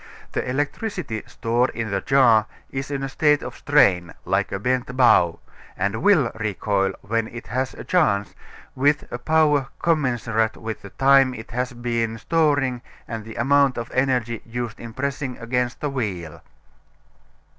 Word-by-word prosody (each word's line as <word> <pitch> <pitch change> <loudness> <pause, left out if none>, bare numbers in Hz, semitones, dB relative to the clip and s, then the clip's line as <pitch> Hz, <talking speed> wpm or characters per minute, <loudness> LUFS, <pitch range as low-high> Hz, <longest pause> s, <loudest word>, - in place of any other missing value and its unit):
The - - -2
electricity 145 - -2
stored 120 +2 0
in 115 -3 -3
the 100 -1 0
jar 115 -5 +4 0.2
is 135 +1 -4
in 140 -1 -3
a - - -1
state 150 +1 +2
of - - -7
strain, 90 - +3
like 95 +2 0
a 100 - -1
bent 125 +4 -1
bow, 90 -10 +4 0.4
and 100 +4 -1
will 155 - +4
recoil, 100 -2 -1
when 115 +2 -1
it 120 +1 -9
has 130 +1 -2
a - - -8
chance, 105 - +1 0.4
with 145 +3 +2
a 120 - -4
power 150 -1 +3
commensurate 120 -8 0
with 110 0 -6
the 100 - -10
time 135 +2 +4
it 110 -1 -10
has 125 +1 -2
been 115 -2 -2
storing 145 -3 +1 0.3
and 115 -1 -5
the 110 - -9
amount 140 +1 +3
of 120 0 -5
energy 125 -3 0
used 120 -1 -5
in 115 - -8
pressing 135 +1 -3
against 125 +1 -2
the 145 - -1
wheel. 95 - -4
125 Hz, 155 wpm, -23 LUFS, 110-135 Hz, 0.4 s, jar